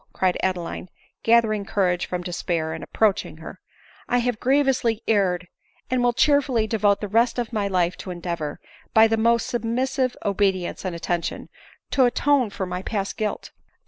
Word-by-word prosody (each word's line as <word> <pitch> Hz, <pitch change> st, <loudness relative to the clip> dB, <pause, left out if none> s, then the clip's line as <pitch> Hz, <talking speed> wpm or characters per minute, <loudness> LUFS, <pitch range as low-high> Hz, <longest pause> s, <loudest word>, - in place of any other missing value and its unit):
cried 185 Hz, -1 st, +1 dB
Adeline, 180 Hz, -1 st, -3 dB, 0.3 s
gathering 225 Hz, -3 st, +3 dB
courage 185 Hz, -4 st, 0 dB
from 180 Hz, -1 st, -3 dB
despair, 170 Hz, -2 st, -2 dB
and 160 Hz, -, -6 dB
ap -, -, -11 dB
proaching 215 Hz, -3 st, +1 dB
her; -, -, -10 dB, 0.3 s
" -, -, -26 dB
I 245 Hz, -, +3 dB
have 245 Hz, -2 st, 0 dB
grievously 260 Hz, -4 st, +2 dB
erred, 180 Hz, -4 st, +1 dB, 0.4 s
and 255 Hz, -1 st, +2 dB
will 245 Hz, 0 st, +3 dB
cheer* 285 Hz, +4 st, +4 dB
fully 240 Hz, -5 st, 0 dB
devote 210 Hz, -2 st, +2 dB
the 210 Hz, -, -3 dB
rest 230 Hz, +4 st, +2 dB
of 240 Hz, -1 st, -3 dB
my 205 Hz, -2 st, 0 dB
life 180 Hz, -2 st, +1 dB
to -, -, -8 dB
endeavor, 170 Hz, -4 st, -4 dB, 0.4 s
by 220 Hz, 0 st, +8 dB
the 225 Hz, 0 st, +2 dB
most 230 Hz, +1 st, +2 dB
submissive 250 Hz, +2 st, -1 dB
obedience 195 Hz, -3 st, 0 dB
and 180 Hz, -2 st, -2 dB
attention, 170 Hz, 0 st, -3 dB, 0.4 s
to 265 Hz, -, +4 dB
atone 265 Hz, 0 st, +2 dB
for 195 Hz, -1 st, -4 dB
my 180 Hz, 0 st, -4 dB
past 200 Hz, 0 st, -3 dB
guilt. 215 Hz, -1 st, -3 dB
210 Hz, 175 wpm, -23 LUFS, 180-240 Hz, 0.4 s, by